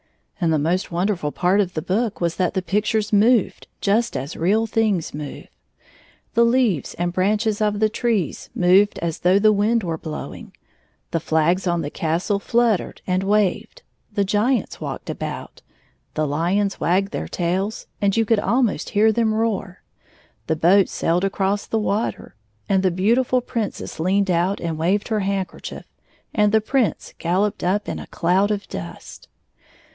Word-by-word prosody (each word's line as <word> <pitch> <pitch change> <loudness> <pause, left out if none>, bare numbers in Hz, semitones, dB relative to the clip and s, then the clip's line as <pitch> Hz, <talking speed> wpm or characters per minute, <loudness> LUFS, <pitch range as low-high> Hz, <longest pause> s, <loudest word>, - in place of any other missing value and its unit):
And 165 - +3
the 155 - +3
most 170 +6 0
wonderftd 175 -3 -1
part 190 +3 +3
of 185 -2 -3
the 155 - -2
book 215 +3 -1
was 170 -1 -1
that 185 0 0
the 190 - 0
pictures 210 +2 0
moved 220 +1 +3
just 215 - +1
as 135 +5 -5
real 205 +7 +2
things 215 -6 0
move. 150 -1 -7 0.9
The 235 - +4
leaves 235 - +1
and 175 0 -2
branches 210 +3 +1
of 210 -1 +1
the 215 0 +3
trees 215 - -1
moved 190 +3 +4
as 165 -2 -3
though 180 +2 +4
the 215 +1 +5
wind 215 +3 +2
were 165 -3 -3
blowing, 155 -1 -8 0.5
the 165 - 0
flags 165 +4 +1
on 170 -1 0
the 145 - -4
castle 170 +5 -1
fluttered 230 -2 0
and 185 0 0
waved, 210 - 0 0.3
the 205 -1 +1
giants 215 +6 0
walked - - -5
about, - - -6 0.5
the 155 - +1
hons 180 +7 0
wagged 195 +3 +1
their - - -4
tails, 190 +5 -2 0.2
and 200 +1 +2
you 225 - +3
could 225 0 +2
almost 215 - 0
hear 215 +2 +4
them 220 -1 +1
roar, 210 -4 -2 0.6
the 160 - +1
boats 180 +5 +4
sailed 170 +3 0
across 195 +1 0
the 225 - -1
water, 215 +1 -2 0.3
and 190 -1 +2
the 190 - +3
beautiftil 235 +7 +1
Princess 225 -9 -4
leaned 190 +3 +2
out 180 +3 +1
and 165 -2 -3
waved 195 +7 +1
her 220 -2 +1
handkerchief, 195 -2 -4 0.5
and 210 -1 +3
the 220 0 +4
Prince 250 0 -1
galloped 190 +5 0
up 195 +4 0
in - - -3
a - - -9
cloud 190 +3 +1
of 205 -1 -2
dust. 85 -1 -8
200 Hz, 165 wpm, -22 LUFS, 175-215 Hz, 0.9 s, the